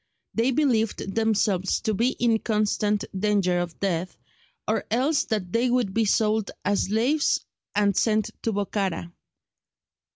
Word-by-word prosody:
They 230 +3 +2
believed 230 -8 0
themselves 205 -4 +1
to 220 - 0
be 235 +6 +1
in 230 -2 +1
constant 210 -1 0
danger 190 -3 +1
of 175 -1 -5
death, 185 -2 -2 0.5
or - - 0
else 270 +6 +1
that 200 -5 -2
they 240 +2 +2
would 240 -6 +1
be 225 +1 +2
sold 215 0 +1 0.2
as 200 +1 +2
slaves 240 +9 +1 0.3
and 200 -1 +2
sent 215 -2 +1
to 225 - -1
Bokhara. 195 -4 -2
215 Hz, 135 wpm, -25 LUFS, 195-230 Hz, 0.5 s, They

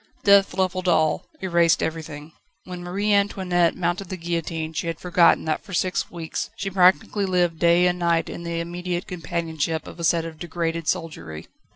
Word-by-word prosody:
Death 200 -2 +5
levelled 185 -1 -1
all, 155 -3 +2 0.2
erased 170 -2 +3
everything. 160 -1 -5 0.3
When 180 -1 -8
Marie 200 +4 0
Antoinette 185 -4 +2
mounted 175 +1 -2
the 185 - -4
guillotine 165 -2 -3
she 165 - -3
had 165 -1 -3
forgotten 175 -2 +3
that 155 -1 -1
for 195 -4 -6
six 185 +1 0
weeks 165 -2 -5
she 195 -1 -4
practically 190 +2 +3
lived 175 -3 +1
day 170 +1 +4
and 180 0 +1
night 170 -1 +1
in - - -7
the 170 -1 -3
immediate 175 +1 -4
companionship 165 -2 -3
of - - -11
a - - -5
set 165 0 +2
of 160 -1 -8
degraded 165 -1 -3
soldiery. 85 - -3
170 Hz, 175 wpm, -23 LUFS, 165-180 Hz, 0.3 s, Death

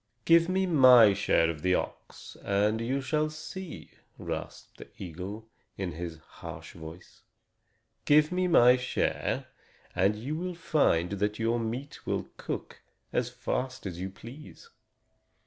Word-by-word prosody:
"Give 165 +1 +5
me 190 +1 +1
my 130 - +7
share 80 -3 +2
of 75 -2 -9
the 90 +1 +2
ox, - - -6
and 105 +3 +1
you 130 +4 -1
shall 155 +3 0
see," 160 +4 -8 0.3
rasped - - -7
the - - -10
eagle, 95 +5 -7 0.3
in 95 -3 -3
his 85 0 -6
harsh 80 - -10
voice. 80 +1 -12 0.8
"Give 150 +2 +5
me 180 0 +1
my 125 -7 +6
share, 125 0 -1 0.5
and 95 +3 +3
you 130 +8 -4
will 180 +2 -4
find 100 - +1
that 105 +1 -1
your 115 +1 0
meat 120 +5 -5
will - - -1
cook - - -6 0.3
as - - 0
fast 130 -2 -4
as 90 -3 -5
you 95 - -3
please." 140 - -12
115 Hz, 140 wpm, -29 LUFS, 95-155 Hz, 0.8 s, my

